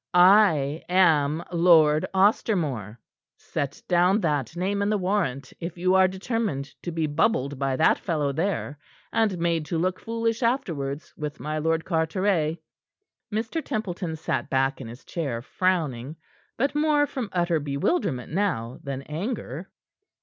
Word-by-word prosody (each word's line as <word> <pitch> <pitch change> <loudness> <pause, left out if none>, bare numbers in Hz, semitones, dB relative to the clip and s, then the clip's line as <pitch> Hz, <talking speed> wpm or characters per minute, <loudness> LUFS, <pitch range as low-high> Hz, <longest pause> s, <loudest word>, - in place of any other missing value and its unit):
I 175 -6 +5
am 160 -4 +3
Lord 165 -3 +5
Ostermore. 175 - +1 0.4
Set 140 -1 -4
down 180 +3 +4
that 150 - -1
name 195 +3 -1
in 200 - +1
the 210 - +2
warrant 180 -9 -1
if 170 +1 -6
you 185 +2 +2
are 190 0 +6
determined 190 - -2 0.2
to 175 - -4
be 160 -1 -1
bubbled 145 - 0
by 135 -1 0
that 155 - +3
fellow 150 -5 -1
there 160 -2 -2 0.3
and 215 -5 +2
made 165 -1 0
to 170 - -1
look 180 +2 0
foolish 230 0 -2
afterwards 160 - -2
with 150 -1 -5
my 155 +1 -3
Lord 160 +1 0
Carteret." 165 -1 0 0.7
Mr. 225 +9 -2
Templeton 180 -6 -3
sat 135 -5 -2
back 135 0 +1
in 125 - -7
his 120 +3 -11
chair, 140 -9 -3
frowning; 155 -6 -1 0.4
but 275 +4 +1
more 295 -1 +3
from 255 -6 -5
utter 175 -2 +1
bewilderment 140 - -1
now 160 - -1
than 135 -1 -5
anger. 170 - -5
170 Hz, 140 wpm, -25 LUFS, 145-195 Hz, 0.7 s, are